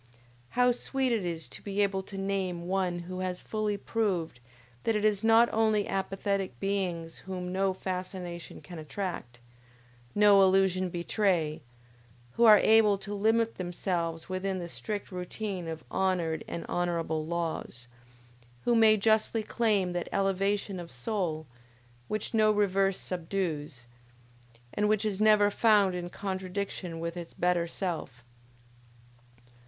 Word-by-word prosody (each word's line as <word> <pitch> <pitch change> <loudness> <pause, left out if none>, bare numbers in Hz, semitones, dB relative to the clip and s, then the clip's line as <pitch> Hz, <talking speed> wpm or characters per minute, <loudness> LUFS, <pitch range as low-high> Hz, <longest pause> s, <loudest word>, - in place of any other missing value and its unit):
How 250 0 +5
sweet 260 +1 -1
it 225 -4 +1
is 165 -5 -4
to - - -8
be 205 0 0
able 195 -1 0
to 195 +1 -9
name 190 -3 -2
one 185 -2 0
who 185 +1 -6
has 185 -1 -2
fully 215 -1 -1
proved 195 - -1 0.4
that 225 - +1
it 210 0 +1
is 210 -1 +2
not 225 +1 +6
only 220 -2 +2
apathetic 195 - -2
beings 180 -5 -2
whom 180 -1 -4
no 190 0 +2
fascination 185 -2 -5
can 175 -2 -9
attract, 155 -6 -5 0.8
no 205 -1 +7
illusion 190 -1 +3
betray, 175 -3 0 0.7
who 235 - +3
are 215 -2 +10
able 220 -1 +5
to 200 +1 -6
limit 225 +2 +1
themselves 175 -2 -2
within 190 0 -2
the 175 -2 -5
strict 205 +4 -5
routine 180 0 -4
of 160 -1 -6
honored 175 -4 0
and 170 - -5
honorable 165 -3 -1
laws, 160 -7 -4 0.8
who 240 - +3
may 220 -2 +6
justly 220 +1 +2
claim 210 -5 +1
that 175 -1 -3
elevation 195 0 0
of 170 -1 -8
soul, 175 -9 -3 0.6
which 215 +2 -3
no 215 -1 +4
reverse 195 -2 +2
subdues, 160 -8 -3 0.9
and 210 0 +1
which 215 0 +2
is 205 -2 -1
never 210 -1 +5
found 205 -4 +4
in 175 -1 -4
contradiction 185 -2 -4
with 170 +1 -4
its 175 -1 -8
better 175 -1 +1
self! 165 -9 -4
190 Hz, 135 wpm, -29 LUFS, 175-205 Hz, 0.9 s, are